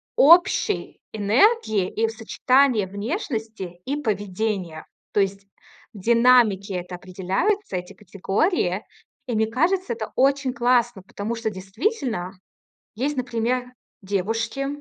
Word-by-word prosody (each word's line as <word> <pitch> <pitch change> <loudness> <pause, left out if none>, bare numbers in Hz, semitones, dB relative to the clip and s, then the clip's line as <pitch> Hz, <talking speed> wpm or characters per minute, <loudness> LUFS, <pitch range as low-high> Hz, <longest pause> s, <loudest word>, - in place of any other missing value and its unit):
общей 350 +7 +4
энергии 220 - +2
и 225 - 0
в 225 - -4
сочетание 245 0 +2
внешности 220 - -5
и 280 - -1
поведения. 205 - -3 0.3
То - - +2
есть 195 0 -2 0.5
в 205 - -10
динамике 230 -3 +4
это 180 0 -5
определяются, 190 - -2
эти 180 +2 -7
категории. 200 - -1 0.4
И 245 -3 -3
мне 220 0 +2
кажется, 330 - 0
это 220 -1 -6
очень 275 0 +2
классно, 240 -4 +2
потому 205 +4 -5
что 225 -1 -2
действительно, 210 - -3 0.6
есть, 275 +5 -2
например, 245 0 -1 0.4
девушки, 225 +7 -2
225 Hz, 115 wpm, -23 LUFS, 195-255 Hz, 0.6 s, общей